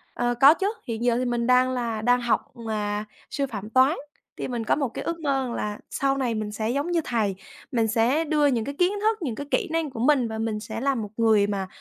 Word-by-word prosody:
Ờ, 240 Hz, 0 st, +1 dB
có 280 Hz, +3 st, +10 dB
chứ, 390 Hz, +3 st, -1 dB, 0.2 s
hiện 230 Hz, 0 st, -3 dB
giờ 240 Hz, -1 st, +3 dB
thì 255 Hz, -, 0 dB
mình 240 Hz, -1 st, -1 dB
đang 255 Hz, 0 st, +4 dB
là 230 Hz, -3 st, -2 dB
đang 245 Hz, +2 st, +3 dB
học, 240 Hz, +2 st, 0 dB, 0.2 s
à, 210 Hz, -1 st, -2 dB, 0.2 s
sư 280 Hz, -1 st, -1 dB
phạm 210 Hz, -2 st, -6 dB
toán 260 Hz, +7 st, +4 dB, 0.4 s
thì -, -, -3 dB
mình 240 Hz, -3 st, -3 dB
có -, -, +2 dB
một 280 Hz, -3 st, 0 dB
cái -, -, -5 dB
ước 335 Hz, 0 st, -3 dB
mơ 275 Hz, -4 st, 0 dB
rằng 235 Hz, -, -4 dB
là 210 Hz, 0 st, -3 dB
sau 275 Hz, 0 st, 0 dB
này 245 Hz, -4 st, 0 dB
mình 215 Hz, -1 st, -3 dB
sẽ 215 Hz, +1 st, -2 dB
giống 285 Hz, +7 st, -1 dB
như 335 Hz, -2 st, +2 dB
thầy, 210 Hz, -5 st, 0 dB, 0.4 s
mình 230 Hz, -3 st, +2 dB
sẽ 245 Hz, +8 st, +2 dB
đưa 300 Hz, -1 st, +2 dB
những 240 Hz, -5 st, +1 dB
cái 280 Hz, -, -5 dB
kiến 360 Hz, +1 st, +4 dB
thức, 440 Hz, 0 st, +2 dB
những 250 Hz, -8 st, -2 dB
cái 285 Hz, -, -6 dB
kỹ -, -, +1 dB
năng 325 Hz, -2 st, 0 dB
của 230 Hz, -, -8 dB
mình 255 Hz, -1 st, +3 dB
và 220 Hz, 0 st, -5 dB
mình 220 Hz, -1 st, -2 dB
sẽ 220 Hz, +1 st, -6 dB
là 275 Hz, 0 st, +1 dB
một 215 Hz, -3 st, -4 dB
người 220 Hz, -3 st, +4 dB
mà, 195 Hz, -2 st, -2 dB
240 Hz, 260 wpm, -25 LUFS, 220-275 Hz, 0.4 s, có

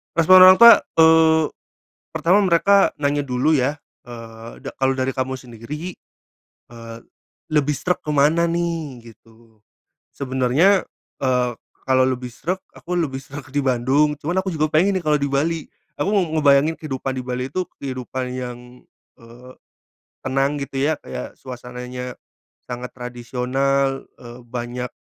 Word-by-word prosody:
Respon 170 Hz, +3 st, +7 dB
orang 185 Hz, -, +9 dB
tua, 235 Hz, +3 st, +9 dB, 0.2 s
eee, 160 Hz, 0 st, +5 dB, 0.7 s
pertama 165 Hz, +5 st, +3 dB
mereka 195 Hz, +3 st, +4 dB
nanya 145 Hz, 0 st, -1 dB
dulu, 130 Hz, +4 st, 0 dB
ya. 135 Hz, +4 st, 0 dB, 0.3 s
Eee, 115 Hz, -1 st, -11 dB
da -, -, -6 dB
kalau 135 Hz, 0 st, +1 dB
dari 130 Hz, 0 st, -1 dB
kamu 130 Hz, 0 st, -3 dB
sendiri, 130 Hz, +8 st, -8 dB, 0.7 s
eee, 115 Hz, -1 st, -10 dB, 0.5 s
lebih 150 Hz, -1 st, +1 dB
sreg 180 Hz, +6 st, -1 dB
ke -, -, -24 dB
mana, 150 Hz, +3 st, +3 dB
nih, 165 Hz, -7 st, -3 dB
gitu? 115 Hz, -1 st, -24 dB, 0.5 s
Sebenarnya 135 Hz, +8 st, +2 dB, 0.4 s
eee, 125 Hz, -2 st, +1 dB, 0.3 s
kalau 130 Hz, -1 st, +3 dB
lebih 130 Hz, -1 st, -1 dB
sreg, 185 Hz, +3 st, -3 dB, 0.2 s
aku 180 Hz, 0 st, -4 dB
lebih 135 Hz, -5 st, -2 dB
sreg 140 Hz, +1 st, -10 dB
di 145 Hz, -, +1 dB
Bandung. 135 Hz, +4 st, +1 dB
Cuman 175 Hz, +6 st, -1 dB
aku 190 Hz, -, -3 dB
juga 155 Hz, -3 st, 0 dB
pengen, 185 Hz, +6 st, +2 dB
nih, 170 Hz, -, -11 dB
kalau 150 Hz, -, +3 dB
di 140 Hz, -, 0 dB
Bali. 155 Hz, +3 st, -1 dB, 0.2 s
Aku 200 Hz, -, -2 dB
mau 195 Hz, -4 st, +2 dB
ngebayangin 145 Hz, +1 st, +4 dB
kehidupan 135 Hz, -4 st, -5 dB
di 130 Hz, -, -4 dB
Bali 125 Hz, 0 st, -4 dB
itu 185 Hz, +7 st, -3 dB, 0.2 s
kehidupan 130 Hz, -1 st, -5 dB
yang 125 Hz, -1 st, -5 dB, 0.6 s
eee, 120 Hz, +2 st, -14 dB, 0.7 s
tenang, 135 Hz, +2 st, -1 dB
gitu, 135 Hz, 0 st, -6 dB
ya, 150 Hz, +4 st, +1 dB
kayak -, -, -7 dB
suasananya 125 Hz, 0 st, -8 dB, 0.6 s
sangat 125 Hz, +1 st, -5 dB
tradisional, 130 Hz, +2 st, -2 dB
eee, 120 Hz, 0 st, -12 dB
banyak, 125 Hz, +1 st, -5 dB
135 Hz, 140 wpm, -21 LUFS, 125-160 Hz, 0.7 s, orang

